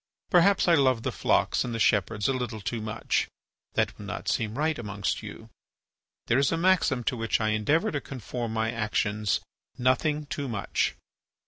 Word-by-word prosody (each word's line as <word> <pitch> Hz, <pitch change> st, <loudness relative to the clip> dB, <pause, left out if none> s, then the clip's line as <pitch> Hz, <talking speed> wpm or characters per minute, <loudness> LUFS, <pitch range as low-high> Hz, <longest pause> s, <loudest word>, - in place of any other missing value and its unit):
Perhaps 190 Hz, +2 st, +5 dB
I 170 Hz, -, +6 dB
love 130 Hz, -6 st, +3 dB
the -, -, -1 dB
flocks -, -, +1 dB
and 120 Hz, -2 st, -4 dB
the -, -, -3 dB
shepherds 105 Hz, 0 st, +2 dB
a 135 Hz, -, +2 dB
little 125 Hz, -4 st, -3 dB
too 110 Hz, +2 st, -3 dB
much. 110 Hz, +1 st, -1 dB, 0.5 s
That -, -, +1 dB
would -, -, -8 dB
not -, -, -5 dB
seem 110 Hz, +1 st, -1 dB
right 155 Hz, +1 st, +1 dB
amongst 105 Hz, -4 st, -2 dB
you. -, -, -10 dB, 0.7 s
There 120 Hz, -, +3 dB
is 140 Hz, -, +2 dB
a 165 Hz, -, +1 dB
maxim 165 Hz, -8 st, +2 dB
to 125 Hz, -, 0 dB
which 115 Hz, -1 st, 0 dB
I 110 Hz, -1 st, +1 dB
endeavour 145 Hz, -, +1 dB
to 145 Hz, -, -2 dB
conform 120 Hz, -2 st, -5 dB
my 110 Hz, 0 st, 0 dB
actions, 105 Hz, -2 st, 0 dB, 0.4 s
"Nothing 140 Hz, +4 st, +1 dB
too 140 Hz, 0 st, -4 dB
much." 110 Hz, -5 st, -1 dB
120 Hz, 180 wpm, -27 LUFS, 110-145 Hz, 0.7 s, I